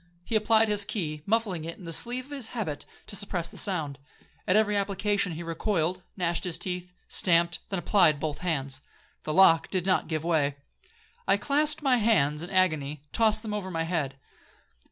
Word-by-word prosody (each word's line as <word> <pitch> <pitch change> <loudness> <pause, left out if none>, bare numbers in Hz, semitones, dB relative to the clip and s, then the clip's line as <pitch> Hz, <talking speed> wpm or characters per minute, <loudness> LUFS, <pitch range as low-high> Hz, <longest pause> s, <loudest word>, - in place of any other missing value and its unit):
He 225 - -2
applied 220 +1 +4
his 205 -1 +5
key, 160 -8 -3
muffling 205 -6 0
it 165 +1 -6
in - - -13
the 165 -1 -4
sleeve 245 +8 +1
of 285 - -17
his 275 -6 -3
habit 155 -10 -3 0.2
to - - -5
suppress 180 -4 0
the - - -15
sound. 155 -8 0 0.5
At 185 - +3
every 215 -1 +3
application 200 -1 0
he 165 +2 -6
recoiled, 170 +1 -1 0.2
gnashed 175 -2 +1
his 180 -3 0
teeth, 180 -1 -4 0.2
stamped—then 170 +2 +1
applied 175 -5 +3
both 150 -1 -3
hands. 140 -6 -2 0.4
The 155 - -2
lock 170 -3 +6
did 185 -2 -1
not 190 -1 +1
give 155 -1 -2
way—I 170 - -2
clasped 295 +7 +1
my 260 -3 +4
hands 160 -10 +2
in 175 - -6
agony—I 155 -7 +1
tossed 220 -1 +2
them 215 -2 -4
over 205 -3 -3
my 165 -2 -2
head. 155 -5 -2
185 Hz, 175 wpm, -27 LUFS, 160-210 Hz, 0.5 s, lock